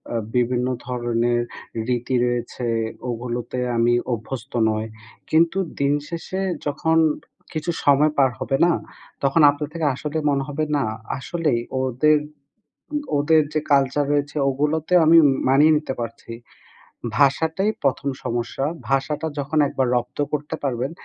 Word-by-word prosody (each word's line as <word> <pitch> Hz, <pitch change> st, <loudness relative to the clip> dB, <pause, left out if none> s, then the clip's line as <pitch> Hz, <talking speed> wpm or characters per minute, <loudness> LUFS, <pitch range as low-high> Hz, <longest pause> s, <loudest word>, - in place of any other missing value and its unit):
আ -, -, +2 dB, 0.2 s
বিভিন্ন 125 Hz, 0 st, +1 dB, 0.2 s
ধরনের 120 Hz, -1 st, 0 dB, 0.5 s
রীতি 125 Hz, +1 st, 0 dB
রয়েছে, 120 Hz, 0 st, -2 dB, 0.4 s
ওগুলোতে 120 Hz, +1 st, -4 dB, 0.2 s
আমি 120 Hz, +1 st, +3 dB, 0.2 s
অভ্যস্ত 120 Hz, +3 st, -6 dB, 0.2 s
নই।" 110 Hz, 0 st, -1 dB, 0.5 s
কিন্তু 165 Hz, +3 st, +3 dB, 0.2 s
দিন 140 Hz, 0 st, +3 dB, 0.2 s
শেষে 175 Hz, +3 st, -4 dB, 0.3 s
যখন 160 Hz, +3 st, +1 dB, 0.6 s
কিছু 155 Hz, +2 st, -2 dB
সময় 145 Hz, +2 st, +5 dB
পার 135 Hz, -2 st, +4 dB
হবে 135 Hz, -, 0 dB
না? 175 Hz, -, +4 dB, 0.5 s
তখন 140 Hz, +4 st, +3 dB
আপনার 145 Hz, 0 st, -5 dB
থেকে 165 Hz, -2 st, -2 dB
আসলে 150 Hz, +3 st, -4 dB
মনে 140 Hz, -1 st, +1 dB
হবে 145 Hz, +1 st, -2 dB
"না 140 Hz, -, +1 dB, 0.3 s
আসলেই 150 Hz, -2 st, -1 dB, 0.2 s
ওদের 130 Hz, +4 st, +3 dB, 0.8 s
উম 295 Hz, -, 0 dB, 0.2 s
ওদের 155 Hz, +2 st, +4 dB
যে 155 Hz, -, +2 dB
কালচার 140 Hz, +1 st, +3 dB
রয়েছে 145 Hz, +1 st, -1 dB
ওগুলোতে 150 Hz, +5 st, 0 dB
আমি 165 Hz, +1 st, +7 dB, 0.3 s
মানিয়ে 145 Hz, +4 st, +5 dB
নিতে 150 Hz, -3 st, -4 dB
পারছি।" 115 Hz, 0 st, -6 dB, 0.9 s
ভাষাটাই 160 Hz, +8 st, +2 dB
১ম 140 Hz, +1 st, +1 dB, 0.2 s
সমস্যা। 120 Hz, +3 st, -2 dB, 0.3 s
ভাষাটা 145 Hz, +3 st, 0 dB
যখন 145 Hz, +2 st, -1 dB
একবার 130 Hz, -2 st, 0 dB
রপ্ত 120 Hz, 0 st, -3 dB
করতে 150 Hz, -1 st, -2 dB
পারবেন, 130 Hz, 0 st, -1 dB
140 Hz, 130 wpm, -22 LUFS, 125-155 Hz, 0.9 s, আমি